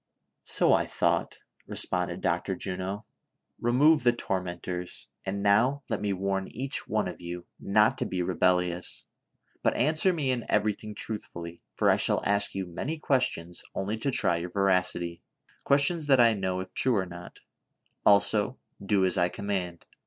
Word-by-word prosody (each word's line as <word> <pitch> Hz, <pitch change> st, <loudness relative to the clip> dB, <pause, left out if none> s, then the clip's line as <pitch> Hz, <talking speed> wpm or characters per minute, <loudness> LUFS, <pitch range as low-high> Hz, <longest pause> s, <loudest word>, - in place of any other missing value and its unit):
"So -, -, +3 dB
I -, -, +2 dB
thought," -, -, 0 dB, 0.3 s
responded -, -, -1 dB
Dr. -, -, 0 dB
Juno. 95 Hz, +3 st, -4 dB, 0.6 s
"Kemove 145 Hz, +6 st, +4 dB
the 120 Hz, -, +4 dB
tormentors; 90 Hz, -4 st, -4 dB, 0.2 s
and 100 Hz, +1 st, -2 dB
now 125 Hz, +8 st, +3 dB
let 110 Hz, -, -1 dB
me 105 Hz, -1 st, 0 dB
warn 95 Hz, 0 st, -1 dB
each 135 Hz, +3 st, -5 dB
one -, -, 0 dB
of -, -, -7 dB
you 85 Hz, 0 st, -6 dB
not 105 Hz, +2 st, +3 dB
to -, -, 0 dB
be 90 Hz, -1 st, -2 dB
rebellious, 90 Hz, 0 st, 0 dB, 0.6 s
but -, -, +1 dB
answer 155 Hz, +8 st, +2 dB
me 150 Hz, -7 st, 0 dB
in 125 Hz, -2 st, -1 dB
everything 105 Hz, 0 st, 0 dB
truthfully, 85 Hz, -6 st, -5 dB
for -, -, +1 dB
I -, -, +3 dB
shall -, -, +3 dB
ask 100 Hz, 0 st, 0 dB
you 95 Hz, -1 st, -2 dB
many 135 Hz, -, -4 dB
questions 125 Hz, -, -1 dB
only 100 Hz, +3 st, -2 dB
to 140 Hz, -, -1 dB
try 85 Hz, -9 st, +2 dB
your 85 Hz, +1 st, -4 dB
veracity; 90 Hz, -3 st, 0 dB, 0.4 s
questions 145 Hz, +3 st, +4 dB
that 135 Hz, -3 st, +5 dB
I 115 Hz, -1 st, +6 dB
know, 95 Hz, -2 st, -2 dB
if 95 Hz, -, -10 dB
true 130 Hz, -3 st, +1 dB
or 95 Hz, -2 st, +1 dB
not; 85 Hz, 0 st, -11 dB, 0.6 s
also, 105 Hz, +4 st, +3 dB, 0.3 s
do 100 Hz, -1 st, +2 dB
as 90 Hz, -, 0 dB
I 90 Hz, -, +3 dB
com 100 Hz, -, -8 dB
mand. 90 Hz, -4 st, -3 dB
100 Hz, 160 wpm, -28 LUFS, 90-120 Hz, 0.6 s, I